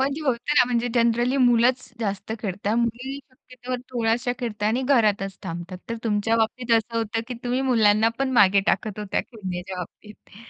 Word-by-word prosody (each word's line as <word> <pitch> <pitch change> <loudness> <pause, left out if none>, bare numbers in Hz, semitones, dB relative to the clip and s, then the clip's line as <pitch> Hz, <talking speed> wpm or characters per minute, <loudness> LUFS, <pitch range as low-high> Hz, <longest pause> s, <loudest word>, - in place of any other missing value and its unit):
म्हणजे 275 +3 0
होत 260 -5 +1 0.2
ना - - +7
म्हणजे 245 -1 0
जनरली 240 +2 +2
मुलंच 245 0 +3
जास्त 200 0 -3
खेळतात, 205 +1 -2
मुली 240 +4 -2
शक्यतो 255 0 -8 0.2
थोड्याश्या 240 0 0
खेळता 210 -4 -3
आणि 235 +5 +1
घरातच 210 -7 +2
थांबतात. 175 0 -6
तर 230 - -2
तुमच्या 220 +1 +1
बाबतीत 230 +2 0
असं 230 +1 -2
होतं 225 0 -1
की 250 - -4
तुम्ही 245 +2 0
मुलांना 220 -1 +4
पण 270 -1 0
मागे 200 -4 +5
टाकत 215 -2 0
होत्या 210 -2 -1
खेळण्याच्या 185 -4 -7
बाबतीत. 205 +3 -11
230 Hz, 165 wpm, -24 LUFS, 205-245 Hz, 0.2 s, ना